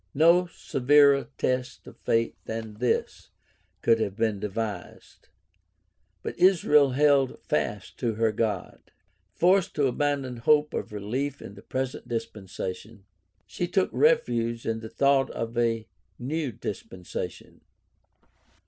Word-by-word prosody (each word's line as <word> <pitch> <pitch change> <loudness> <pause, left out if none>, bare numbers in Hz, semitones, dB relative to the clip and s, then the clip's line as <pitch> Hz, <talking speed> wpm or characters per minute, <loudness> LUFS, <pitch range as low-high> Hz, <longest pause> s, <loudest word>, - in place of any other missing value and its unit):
No 170 +4 +5
severer 140 -3 +3
test 130 0 -2
of - - -12
faith 115 0 +1
than 110 -1 -6
this 125 0 -1 0.5
could 115 -1 +4
have 100 -3 -2
been 110 -2 0
devised. 105 -2 -6 0.9
But - - -6
Israel 150 -7 +5
held 140 -1 +3
fast 95 +6 -2
to 115 -3 -1
her 110 0 +2
God. 105 -4 -2 0.6
Forced 185 +1 +3
to 145 - +2
abandon 135 -1 -1
hope 150 +5 +3
of - - -4
relief 125 +8 -3
in - - -10
the 100 - -13
present 130 +2 -4
dispensation 105 -3 -6 0.4
she 175 - -3
took 185 +1 +1
refuge 120 - +2
in 115 0 -1
the 110 0 -8
thought 140 +1 +2
of 115 +1 -5
a 115 -2 0 0.3
neW 145 +2 -3
dispensation. 95 -3 -7
120 Hz, 120 wpm, -26 LUFS, 110-145 Hz, 0.9 s, No